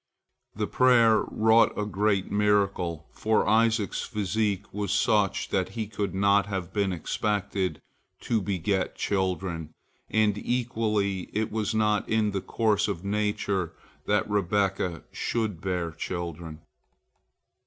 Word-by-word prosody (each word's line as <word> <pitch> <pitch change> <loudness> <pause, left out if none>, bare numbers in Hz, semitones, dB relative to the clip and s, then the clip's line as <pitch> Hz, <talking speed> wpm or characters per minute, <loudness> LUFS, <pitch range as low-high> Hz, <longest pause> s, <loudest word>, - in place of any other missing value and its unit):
The 105 +1 -1
prayer 120 -2 +4
wrought 110 +1 +4
a 105 - -1
great 105 -1 0
miracle, 100 -6 +1
for 110 0 +1
Isaac's 110 -1 +2
physique 105 -2 -2
was 100 -2 -2
such 105 -3 +2
that - - 0
he 110 - -1
could 100 -2 -3
not 100 +1 +3
have 95 -4 -4
been 100 -2 +1
expected 100 +2 -2 0.4
to 115 -2 0
beget 95 -1 -1
children, 90 -5 -2 0.3
and 105 -1 +2
equally 110 -6 -1
it 110 +1 -1
was 110 0 -1
not 105 -1 +1
in 110 -1 +2
the 100 -1 -2
course 105 -1 +1
of 100 -2 -4
nature 100 -4 -1 0.3
that 105 -2 +2
Rebekah 95 -3 0
should 110 -7 -2
bear 90 -3 -2
children. 85 -1 -5
100 Hz, 120 wpm, -27 LUFS, 95-110 Hz, 0.4 s, prayer